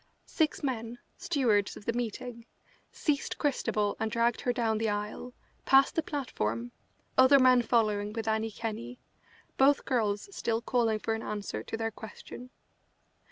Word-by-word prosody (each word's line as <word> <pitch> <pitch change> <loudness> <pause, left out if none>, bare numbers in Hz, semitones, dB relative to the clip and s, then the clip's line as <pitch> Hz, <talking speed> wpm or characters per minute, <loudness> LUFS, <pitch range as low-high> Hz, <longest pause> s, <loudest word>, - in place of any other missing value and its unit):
Six 310 -2 0
men, 235 -3 -3 0.2
stewards 250 - +1
of 205 - -13
the 230 - 0
meeting, 235 0 -5 0.4
seized 290 -3 -1
Christabel 215 -8 0
and 220 0 -1
dragged 235 +1 +1
her 245 - +1
down 225 -3 0
the 225 -1 0
aisle, 210 +4 -4 0.3
past 270 0 +5
the 325 - +1
platform, 120 - -3 0.5
other 260 +2 +8
men 255 -2 +6
following 215 -3 +1
with 225 0 -5
Annie 220 0 0
Kenney, 230 +3 -6 0.6
both 275 +1 +4
girls 210 -5 0
still 225 -1 0
calling 230 -2 +1
for 225 +1 -2
an 225 - -3
answer 210 -2 -4
to - - -5
their 225 0 -2
question. 235 +3 -10
230 Hz, 150 wpm, -30 LUFS, 215-250 Hz, 0.6 s, other